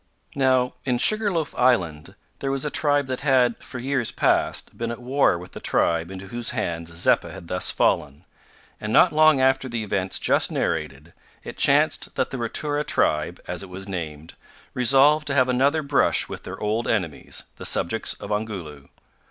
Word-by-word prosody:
Now, 130 Hz, -2 st, +2 dB
in 125 Hz, -2 st, 0 dB
Sugar 215 Hz, -, +3 dB
loaf 165 Hz, -4 st, -2 dB
Island, 90 Hz, -12 st, 0 dB, 0.2 s
there 135 Hz, -, -3 dB
was 135 Hz, +1 st, -1 dB
a 150 Hz, -, -2 dB
tribe 145 Hz, -2 st, +2 dB
that 130 Hz, -1 st, -4 dB
had, 130 Hz, -4 st, +2 dB
for -, -, -8 dB
years 130 Hz, -1 st, -1 dB
past, -, -, 0 dB
been 115 Hz, 0 st, -4 dB
at 120 Hz, -, -5 dB
war 130 Hz, -5 st, +2 dB
with 90 Hz, +1 st, -11 dB
the -, -, -8 dB
tribe 85 Hz, 0 st, 0 dB
into 95 Hz, 0 st, -9 dB
whose 120 Hz, +1 st, -2 dB
hands 85 Hz, 0 st, -3 dB
Zeppa 85 Hz, 0 st, +1 dB
had 95 Hz, -3 st, -11 dB
thus 90 Hz, +1 st, +1 dB
fallen, 75 Hz, +4 st, 0 dB, 0.5 s
and, 105 Hz, -, -5 dB
not 170 Hz, +8 st, +5 dB
long 155 Hz, -2 st, +5 dB
after 130 Hz, 0 st, +2 dB
the 115 Hz, -2 st, -3 dB
events 95 Hz, -3 st, -1 dB
just -, -, +2 dB
narrated, 75 Hz, +5 st, -3 dB, 0.3 s
it -, -, -8 dB
chanced -, -, +2 dB
that -, -, -1 dB
the 135 Hz, -, -5 dB
Ratura 145 Hz, +5 st, -1 dB
tribe, 75 Hz, -, 0 dB
as 90 Hz, -1 st, -2 dB
it 100 Hz, -, -7 dB
was 95 Hz, +2 st, -7 dB
named, 80 Hz, -4 st, -6 dB, 0.4 s
resolved 140 Hz, +5 st, +4 dB
to 140 Hz, -, -1 dB
have 130 Hz, -2 st, +4 dB
another 140 Hz, +5 st, +2 dB
brush 140 Hz, -1 st, +2 dB
with -, -, -9 dB
their 95 Hz, -, -7 dB
old 110 Hz, +3 st, -1 dB
enemies, 90 Hz, -9 st, -2 dB
the -, -, -9 dB
subjects 110 Hz, +7 st, 0 dB
of -, -, -9 dB
Ongoloo. 95 Hz, -10 st, -5 dB
120 Hz, 180 wpm, -23 LUFS, 90-135 Hz, 0.5 s, not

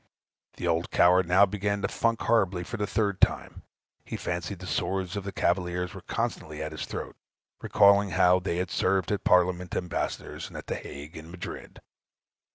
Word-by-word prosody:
The -, -, -4 dB
old 85 Hz, +1 st, 0 dB
coward 90 Hz, 0 st, +4 dB
now 95 Hz, +3 st, +6 dB
began 100 Hz, 0 st, -2 dB
to -, -, +2 dB
"funk" 115 Hz, -1 st, 0 dB
horribly 95 Hz, -6 st, +2 dB
for 120 Hz, -, -6 dB
the 105 Hz, -1 st, -1 dB
third 100 Hz, -3 st, 0 dB
time; -, -, +1 dB, 0.4 s
he -, -, -5 dB
fancied 90 Hz, +3 st, -3 dB
the 95 Hz, -, -9 dB
swords 95 Hz, +3 st, -2 dB
of 100 Hz, -, -3 dB
the 100 Hz, -, -5 dB
cavaliers 90 Hz, -1 st, -1 dB
were -, -, -9 dB
constantly 75 Hz, -1 st, -3 dB
at 80 Hz, -, -5 dB
his 80 Hz, -, -5 dB
throat, -, -, -6 dB, 0.5 s
recollecting 100 Hz, 0 st, +5 dB
how 90 Hz, +1 st, +5 dB
they 90 Hz, -2 st, -2 dB
had 90 Hz, +1 st, -2 dB
served 95 Hz, -1 st, +1 dB
the 105 Hz, -, 0 dB
Parliament 90 Hz, 0 st, +2 dB
ambassadors 90 Hz, -2 st, -3 dB
at -, -, -8 dB
the -, -, -3 dB
Hague 75 Hz, +4 st, -8 dB
and 80 Hz, +1 st, -10 dB
Madrid. 90 Hz, +1 st, -8 dB
90 Hz, 175 wpm, -27 LUFS, 90-100 Hz, 0.5 s, now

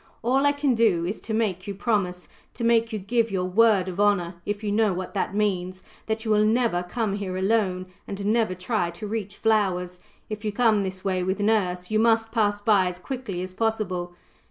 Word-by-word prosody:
All 265 Hz, +4 st, +3 dB
I -, -, +5 dB
can 285 Hz, -2 st, +1 dB
do 215 Hz, -8 st, +2 dB
is 195 Hz, +5 st, -4 dB
to 220 Hz, -, -6 dB
make 210 Hz, -4 st, -1 dB
you 200 Hz, -, -4 dB
promise 190 Hz, -4 st, -1 dB, 0.3 s
to -, -, -5 dB
make 230 Hz, 0 st, +3 dB
you 215 Hz, -, -2 dB
give 230 Hz, +3 st, 0 dB
your 190 Hz, -2 st, -1 dB
word 200 Hz, 0 st, +4 dB
of 185 Hz, +1 st, -5 dB
honour, 200 Hz, -4 st, +2 dB
if 205 Hz, +1 st, -3 dB
you 205 Hz, -, -1 dB
know 210 Hz, -1 st, +2 dB
what 185 Hz, 0 st, -5 dB
that 195 Hz, -1 st, -2 dB
means 185 Hz, -3 st, -1 dB, 0.2 s
that 220 Hz, +1 st, -2 dB
you 220 Hz, -, 0 dB
will 210 Hz, 0 st, +4 dB
never 220 Hz, -4 st, +2 dB
come 200 Hz, +2 st, -2 dB
here 185 Hz, -2 st, -4 dB
alone, 190 Hz, -2 st, +1 dB, 0.2 s
and 200 Hz, 0 st, -5 dB
never 220 Hz, -2 st, +1 dB
try 185 Hz, -1 st, -1 dB
to 170 Hz, +5 st, -8 dB
reach 210 Hz, -1 st, -4 dB
flowers; 185 Hz, -5 st, +1 dB, 0.3 s
if 215 Hz, 0 st, -6 dB
you 210 Hz, -, -1 dB
come 220 Hz, -1 st, +3 dB
this 190 Hz, -1 st, -5 dB
way 185 Hz, -1 st, 0 dB
with 190 Hz, +3 st, -1 dB
nurse, 195 Hz, -3 st, 0 dB
you 215 Hz, -, +2 dB
must 225 Hz, 0 st, +3 dB
pass 205 Hz, -3 st, +1 dB
by 205 Hz, -4 st, +4 dB
as 180 Hz, 0 st, -4 dB
quickly 200 Hz, -3 st, -5 dB
as 185 Hz, 0 st, -7 dB
possible. 190 Hz, -5 st, -2 dB
205 Hz, 210 wpm, -25 LUFS, 185-225 Hz, 0.3 s, I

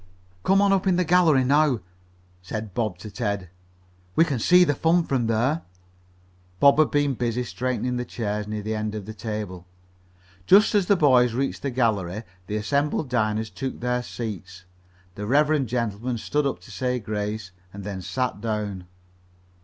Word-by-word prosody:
"Come 195 Hz, -, +3 dB
on 200 Hz, -1 st, +4 dB
up 195 Hz, 0 st, +1 dB
in 185 Hz, -, +4 dB
the 180 Hz, -, +2 dB
gallery 165 Hz, -6 st, +4 dB
now," 140 Hz, -1 st, +3 dB, 0.6 s
said 105 Hz, +2 st, -6 dB
Bob 110 Hz, -5 st, -1 dB
to 105 Hz, +3 st, -9 dB
Ted. 100 Hz, -4 st, -3 dB, 0.6 s
"We 165 Hz, -, +5 dB
can 135 Hz, -7 st, -2 dB
see 180 Hz, +9 st, +6 dB
the 145 Hz, -, +2 dB
fun 165 Hz, +5 st, +2 dB
from 130 Hz, -6 st, 0 dB
there." 120 Hz, +8 st, +1 dB, 1.0 s
Bob 140 Hz, +1 st, +6 dB
had 155 Hz, -, +5 dB
been 145 Hz, -1 st, +1 dB
busy 120 Hz, 0 st, -1 dB
straightening 125 Hz, 0 st, -2 dB
the 125 Hz, -, -1 dB
chairs 105 Hz, -3 st, -3 dB
near 105 Hz, -1 st, -4 dB
the 110 Hz, -, -3 dB
head 110 Hz, -1 st, -2 dB
of 105 Hz, -3 st, -5 dB
the 110 Hz, -, -7 dB
table. 105 Hz, -6 st, -5 dB, 0.8 s
Just 205 Hz, +4 st, +6 dB
as 200 Hz, -4 st, +2 dB
the 200 Hz, -, +5 dB
boys 125 Hz, -7 st, +4 dB
reached 135 Hz, +2 st, -2 dB
the 140 Hz, -, -2 dB
gallery, 110 Hz, -5 st, 0 dB, 0.2 s
the 105 Hz, -, -3 dB
assembled 140 Hz, +6 st, 0 dB
diners 110 Hz, -2 st, 0 dB
took 135 Hz, -1 st, -5 dB
their 125 Hz, 0 st, 0 dB
seats. 95 Hz, -7 st, -7 dB, 0.5 s
The 105 Hz, +2 st, -6 dB
reverend 145 Hz, +1 st, +3 dB
gentleman 115 Hz, +1 st, -2 dB
stood 145 Hz, +5 st, 0 dB
up 140 Hz, -, -3 dB
to 115 Hz, -, -14 dB
say 125 Hz, +6 st, -1 dB
grace, 105 Hz, -2 st, -4 dB, 0.2 s
and 100 Hz, +1 st, -9 dB
then 95 Hz, -2 st, -5 dB
sat 100 Hz, +4 st, -2 dB
down. 105 Hz, -5 st, -3 dB
120 Hz, 170 wpm, -24 LUFS, 105-140 Hz, 1.0 s, see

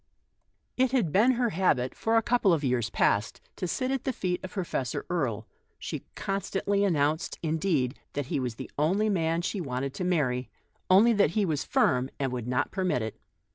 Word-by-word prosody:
It 260 Hz, 0 st, +2 dB
had 220 Hz, -, +2 dB
been 225 Hz, -, +5 dB
her 240 Hz, -2 st, 0 dB
habit 150 Hz, -9 st, +1 dB
for 225 Hz, +1 st, +1 dB
a 225 Hz, -, +3 dB
couple 235 Hz, -6 st, +3 dB
of 155 Hz, -3 st, 0 dB
years 125 Hz, -4 st, +1 dB
past 105 Hz, 0 st, +1 dB, 0.2 s
to 180 Hz, -, -3 dB
sit 255 Hz, +9 st, -1 dB
at 270 Hz, -1 st, -1 dB
the 265 Hz, -, 0 dB
feet 180 Hz, -6 st, -2 dB
of 185 Hz, -, -5 dB
Professor 170 Hz, -, -3 dB
Erie; 125 Hz, -11 st, -1 dB, 0.3 s
she -, -, -6 dB
constantly 200 Hz, +1 st, -1 dB
announced, 155 Hz, -4 st, +1 dB
laughing, 155 Hz, -5 st, 0 dB, 0.2 s
that 145 Hz, -1 st, -2 dB
he 145 Hz, +1 st, -2 dB
was 125 Hz, -3 st, -3 dB
the -, -, -8 dB
only 195 Hz, +8 st, +2 dB
man 165 Hz, -3 st, 0 dB
she 195 Hz, +2 st, -2 dB
ever 170 Hz, -, -4 dB
wanted 130 Hz, +1 st, -3 dB
to 180 Hz, -, -4 dB
marry, 140 Hz, -9 st, 0 dB, 0.4 s
only 210 Hz, +6 st, +6 dB
that 205 Hz, -7 st, +4 dB
he 210 Hz, -, +3 dB
was 155 Hz, -5 st, -1 dB
firm, 130 Hz, 0 st, +2 dB
and 135 Hz, -2 st, -1 dB
would 125 Hz, -2 st, -4 dB
not 125 Hz, +3 st, 0 dB
permit 180 Hz, -, 0 dB
it. 110 Hz, -, -6 dB
165 Hz, 195 wpm, -28 LUFS, 130-200 Hz, 0.4 s, only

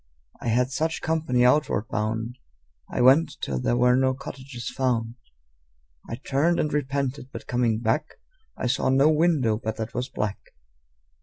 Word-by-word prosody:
I -, -, -5 dB
had 125 Hz, +3 st, +2 dB
such 160 Hz, +4 st, -1 dB
company 155 Hz, -7 st, +1 dB
outward 125 Hz, -5 st, +2 dB
bound. 110 Hz, +3 st, -2 dB, 0.5 s
I -, -, -1 dB
went 135 Hz, +6 st, +5 dB
till 65 Hz, -2 st, -2 dB
there 120 Hz, -, +1 dB
were 125 Hz, 0 st, +4 dB
no 130 Hz, 0 st, +2 dB
cottages 135 Hz, -2 st, -8 dB
found. 125 Hz, -4 st, -1 dB, 1.0 s
I -, -, -3 dB
turned 140 Hz, +7 st, +1 dB
and 150 Hz, -, 0 dB
repented, 140 Hz, -2 st, -2 dB
but -, -, -8 dB
coming 120 Hz, -3 st, +1 dB
back 115 Hz, +6 st, -1 dB, 0.4 s
I -, -, -3 dB
saw 125 Hz, +2 st, +1 dB
no 135 Hz, +4 st, +5 dB
window 150 Hz, -9 st, +2 dB
but 110 Hz, 0 st, -2 dB
that 110 Hz, +1 st, -5 dB
was 125 Hz, +2 st, -3 dB
black. 105 Hz, -5 st, -3 dB
125 Hz, 155 wpm, -25 LUFS, 115-140 Hz, 1.0 s, went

